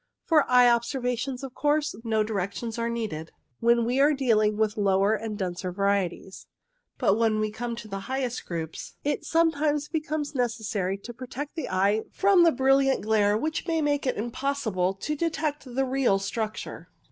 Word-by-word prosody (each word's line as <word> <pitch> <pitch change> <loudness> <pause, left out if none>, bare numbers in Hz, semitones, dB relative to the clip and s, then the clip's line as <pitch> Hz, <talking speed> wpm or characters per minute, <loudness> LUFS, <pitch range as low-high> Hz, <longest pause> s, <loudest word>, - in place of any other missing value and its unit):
For 310 -4 +3
eye 250 -1 +7
observation, 245 +1 0
of 265 -2 -6
course, 295 +1 +1
no 220 -2 +1
direc 200 -3 -2
tions 235 -1 -5
are 230 0 0
needed 210 -9 -4 0.3
when 235 0 +3
we 250 +3 0
are 290 +2 +5
dealing 215 -6 +2
with 215 -1 +1
the 215 - -3
lower 195 +1 +3
and 220 -1 -3
denser 180 -1 -3
varieties; 195 -1 -1 0.5
but 200 +3 +2
when 220 -2 +2
we 215 0 -1
come 235 +2 -4
to 230 -1 -9
the 195 -1 -5
highest 260 -2 -2
groups 165 -2 -5
it 290 - -1
sometimes 300 -3 +1
becomes 305 -2 -2
necessary 220 -6 -1
to 235 +4 -9
protect 260 +4 -7
the 320 - -4
eye 195 +3 +2
from 395 -2 +4
the 335 - +6
brilliant 270 -1 +3
glare 210 -1 +2
which 315 +7 -3
may 325 -1 +1
make 290 -2 0
it 255 - 0
impossible 225 -5 -1
to 300 +10 -3
detect 305 -2 -2
the 265 +1 -1
real 260 -6 +2
structure. 215 +2 -4
235 Hz, 175 wpm, -26 LUFS, 210-275 Hz, 0.5 s, eye